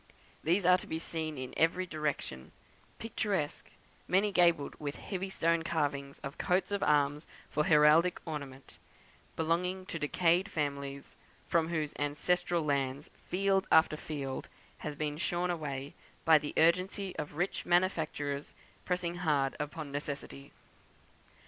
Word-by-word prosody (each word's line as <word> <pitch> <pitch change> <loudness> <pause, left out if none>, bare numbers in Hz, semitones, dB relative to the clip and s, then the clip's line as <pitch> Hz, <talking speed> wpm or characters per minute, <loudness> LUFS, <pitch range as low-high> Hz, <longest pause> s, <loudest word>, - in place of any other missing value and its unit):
These 175 +4 +2
are 180 0 +6
to - - -8
be 160 - -2
seen 160 -2 -4
in 130 -1 -6
every 170 +3 +2
direction, 150 - -4 0.4
picturesque, 205 -8 -2 0.4
many 200 +3 +3
gabled, 170 -6 +3
with 145 -1 -4
heavy 195 -1 -4
stone 170 -3 +1
carvings 145 -4 -2
of 140 +2 -6
coats 185 +2 +1
of 200 - 0
arms 145 +1 +2 0.2
for 150 - +1
heraldic 155 +3 +5
ornament; 140 -4 -7 0.6
belonging 180 +3 0
to 165 - -5
decayed 170 +5 +2
families, 140 -2 -3 0.3
from 165 -1 +2
whose 155 -3 -2
ancestral 170 +4 +1
lands 140 -1 -1 0.2
field 195 +1 +2
after 160 -1 +6
field 140 -4 -5 0.3
has 150 -1 -5
been 150 0 -2
shorn 175 +1 0
away, 140 -4 -4 0.3
by 160 -1 +7
the 150 - -6
urgency 185 +4 +2
of 150 0 -5
rich 180 +3 -1
manufacturers 160 -5 0 0.3
pressing 180 -1 -1
hard 145 -6 +1
upon 150 0 -5
necessity. 140 -1 -6
160 Hz, 130 wpm, -32 LUFS, 145-180 Hz, 0.6 s, by